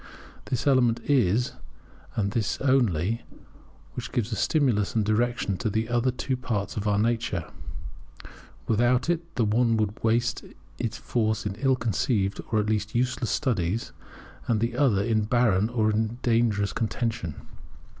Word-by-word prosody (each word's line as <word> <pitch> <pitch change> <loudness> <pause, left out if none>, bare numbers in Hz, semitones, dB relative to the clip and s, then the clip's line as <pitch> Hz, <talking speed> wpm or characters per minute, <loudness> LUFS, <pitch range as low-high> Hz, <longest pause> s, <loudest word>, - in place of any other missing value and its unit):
This 130 +2 -2
element 125 -4 +3
it - - -1
is, 120 -2 +3 0.6
and 100 -2 0
this 110 -1 -1
only, 115 - +2 0.7
which 125 - -6
gives 120 -3 -1
a - - -1
stimulus 120 -6 +1
and 110 -2 +2
direction 110 -2 0
to 110 - -1
the 110 +2 -1
other 120 +1 +2
two 130 +1 -2
parts 115 -5 -3
of 105 0 -2
our 100 -1 +2
nature: 110 -5 0 1.2
without 120 +7 +2
it 170 0 -4
the 115 - +2
one 115 +2 +2
would 105 -1 -2
waste 120 +2 +1 0.4
its 115 -3 -2
force 110 -2 -1
in 105 - -1
ill 135 -1 +3
conceived, 105 -3 0
or, 110 - +3
at 105 - +1
least, 110 0 -1
useless 125 -1 0
studies, 110 - -1 0.6
and 115 -2 +2
the 115 +2 -1
other 120 -8 +3
in 110 -1 +1
barren 110 -3 +2
or 110 -3 +1
even 110 +2 -1
dangerous 115 -4 +2
contention. 115 -8 -2
115 Hz, 155 wpm, -26 LUFS, 105-125 Hz, 1.2 s, element